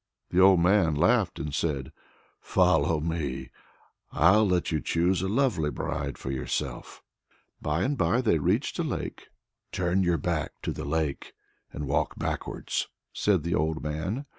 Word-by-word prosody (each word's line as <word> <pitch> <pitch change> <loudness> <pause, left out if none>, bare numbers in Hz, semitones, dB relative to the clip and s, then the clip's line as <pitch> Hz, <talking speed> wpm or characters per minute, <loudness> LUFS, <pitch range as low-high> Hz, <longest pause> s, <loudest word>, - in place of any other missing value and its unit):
'" - - -55
The 90 - +4
old 95 -1 +7
man 90 -4 +3
laughed 95 +4 +2
and 75 0 -4
said: 75 -3 -2 0.5
"Follow 80 -4 +2
me, 75 -4 -3 0.6
I'll 105 +2 +5
let 90 -2 +1
you 80 -2 0
choose 85 +4 +1
a 95 - -1
lovely 105 - +1
bride 70 - -4
for 65 - -5
yourself." 65 - -4 0.6
By 75 +4 0
and 145 +2 0
by 125 -1 +2
they 105 -10 +2
reached - - 0
a - - +1
lake. - - -4 0.4
"Turn 90 0 +1
your 85 -2 +2
back 80 +1 -2
to - - -1
the - - -6
lake 75 -1 -2 0.4
and 75 - -5
walk 70 +1 -1
backwards," - - -3 0.3
said 95 -7 +1
the 85 +1 -1
old 80 0 0
man. 85 - -3
85 Hz, 160 wpm, -27 LUFS, 75-95 Hz, 0.6 s, old